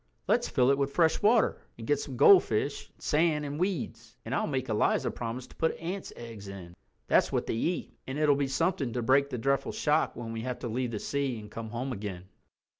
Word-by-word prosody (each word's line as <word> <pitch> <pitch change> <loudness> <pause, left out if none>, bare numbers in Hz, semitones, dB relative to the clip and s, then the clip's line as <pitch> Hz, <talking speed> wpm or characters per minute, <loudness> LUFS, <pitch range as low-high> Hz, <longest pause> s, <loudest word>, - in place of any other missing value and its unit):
"Let's - - +2
fill 125 +1 +3
it 140 - +1
with 140 0 +1
fresh 160 +2 +2
water, 220 +2 +3 0.2
and 115 - -8
get 145 +3 +2
some 135 -4 -6
goldfish 140 - +4
and - - -35
sand 150 -1 +1
and 145 +1 -4
weeds; 125 - -3
and 115 - -4
I'll - - +1
make 130 -3 -2
Eliza 110 -2 +1
promise 120 +2 -5
to - - -18
put 160 - 0
ants' 180 +4 -5
eggs 115 -4 -9
in—that's 90 -3 -2
what - - 0
they - - -2
eat—and 135 0 -3
it'll 150 -2 +4
be 140 -1 0
something 135 -2 0
to 120 - -2
break 140 +4 +4
the 125 - -3
dreadful 135 +3 0
shock 150 +1 +1
when 115 -1 -6
we 115 - -4
have 125 +1 -3
to - - -3
leave 125 +2 -1
the 110 -3 -4
sea 140 -3 -2
and 105 -1 -11
come 115 -1 -6
home 120 +4 -3
again." 100 -4 -6
130 Hz, 215 wpm, -29 LUFS, 115-150 Hz, 0.2 s, goldfish